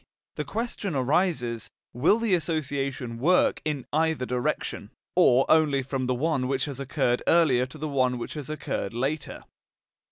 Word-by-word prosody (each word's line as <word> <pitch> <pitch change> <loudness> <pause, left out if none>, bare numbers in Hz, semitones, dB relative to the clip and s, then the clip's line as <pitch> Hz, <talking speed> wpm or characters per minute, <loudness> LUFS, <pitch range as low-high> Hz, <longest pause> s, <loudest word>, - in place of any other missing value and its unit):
The - - -4
question 220 -6 -3
arises: 130 - 0 0.2
will 150 - +3
the 230 -4 0
association 140 -7 -1
work 180 +8 +3
in 150 -5 -3
either 160 -3 +1
direction, 125 -1 -2 0.3
or 130 +2 +5
only 150 -4 +3
from 135 0 -2
the 130 - +1
one 140 -1 0
which 135 0 0
has 140 -2 -6
occurred 135 -3 0
earlier 135 -7 +4
to 130 - -11
the 155 +1 -4
one 130 -3 +1
which 120 - -5
has 150 -3 -6
occurred 135 -8 -3
later? 140 +5 -2
140 Hz, 155 wpm, -26 LUFS, 125-160 Hz, 0.3 s, or